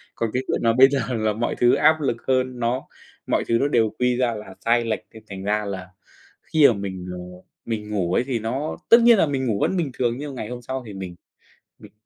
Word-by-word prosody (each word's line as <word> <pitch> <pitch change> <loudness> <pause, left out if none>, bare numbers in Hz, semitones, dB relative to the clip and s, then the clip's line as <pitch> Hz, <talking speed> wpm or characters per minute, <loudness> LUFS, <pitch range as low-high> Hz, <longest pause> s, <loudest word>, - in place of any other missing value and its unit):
Còn 115 - -1
cái 130 - -1
chuyện - - 0
là 115 -1 +4
bây 130 +2 +7
giờ 140 -1 0
là 110 -3 0
mọi 120 +3 -2
thứ 120 0 +4
áp 155 +1 +4
lực 135 -5 0
hơn, 130 -1 0
nó 120 +3 -1 0.4
mọi - - +1
thứ 115 - +3
nó 140 - +2
đều 115 -6 +2
quy 125 0 +2
ra 125 -2 +1
là 95 -3 -9
sai 115 0 +3
lệch, 110 -1 -1
nên 110 -1 -13
thành 95 -1 -7
ra 105 +1 0
là 95 -2 -6 0.5
khi 155 -3 +4
mà - - +4
mình, 95 -2 -6
ờ, 90 - -6 0.5
mình 105 -2 -4
ngủ 90 -4 -1
ấy 125 - +2
thì 125 -3 -2
nó 130 +8 -3
tất 230 - +9
nhiên 235 -2 +6
là 165 - +4
mình 135 -3 -2
ngủ 105 -3 0
vẫn 190 - +1
bình 165 -6 -1
thường 120 -2 0
nhưng 145 -1 -6
ngày 110 -3 -5
hôm 125 0 -7
sau 130 +1 -4
thì 105 - -9
mình 95 -2 -7 0.6
mình - - -14
120 Hz, 250 wpm, -23 LUFS, 105-130 Hz, 0.6 s, tất